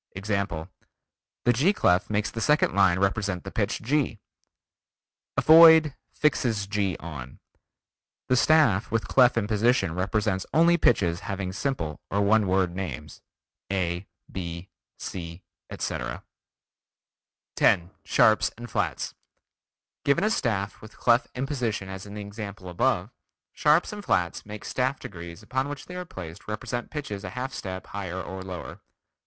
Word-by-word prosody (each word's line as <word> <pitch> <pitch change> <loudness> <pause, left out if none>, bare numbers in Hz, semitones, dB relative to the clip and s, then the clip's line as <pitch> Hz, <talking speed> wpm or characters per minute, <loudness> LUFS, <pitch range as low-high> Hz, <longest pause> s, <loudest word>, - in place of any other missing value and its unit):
Example: 100 -5 -2 0.8
The 120 - +4
G 150 - +3
clef 90 - +2
makes 105 0 0
the 115 - -5
second 150 +4 +3
line 95 -2 +4
represent 100 -1 0
the - - -7
pitch - - -1
G. 135 -2 0 1.2
Avoid 160 -2 +8 0.2
"fixes 115 -8 +1
G 100 -3 -1
on." 75 -6 -8 0.9
The 125 - +3
staff 125 -8 +4
with 115 -1 -1
clef 125 -2 +5
in 110 - +1
position 110 -3 +2
represents 95 +1 -1
only 170 +2 +6
pitches 90 - +2
having 95 -2 -4
simple 95 - -3
or 100 - 0
one 105 0 +3
word 90 -1 +1
names, 90 -9 -6 0.5
A, 90 -1 -1 0.2
B, 85 0 -6 0.3
C, 85 -1 -7 0.3
etc. - - -4 1.3
10. 85 +1 +3
Sharps, 110 0 +4 0.2
Flats: - - -2 0.9
Given 140 +6 +2
a 215 - +2
staff 105 - -1
with 110 - -13
clef 120 0 +3
in 130 +2 -1
position 120 -9 -2
as 95 +1 -7
in 100 +1 -8
example 100 -2 -7
above, 110 +1 0 0.4
sharps 150 +7 +3
and 205 -1 -7
flats 90 - 0
make 105 0 -8
staff 130 +1 -1
degrees 85 +3 -9
upon 130 +5 -2
which 145 -1 -7
they 180 - -9
are 180 0 -5
placed 85 - -9
represent 120 +3 -4
pitches 135 -10 -5
a - - -5
half 130 +1 -3
step 95 -1 -6
higher 95 -2 -5
or 95 0 -6
lower. 95 -2 -7
105 Hz, 140 wpm, -26 LUFS, 95-125 Hz, 1.3 s, Avoid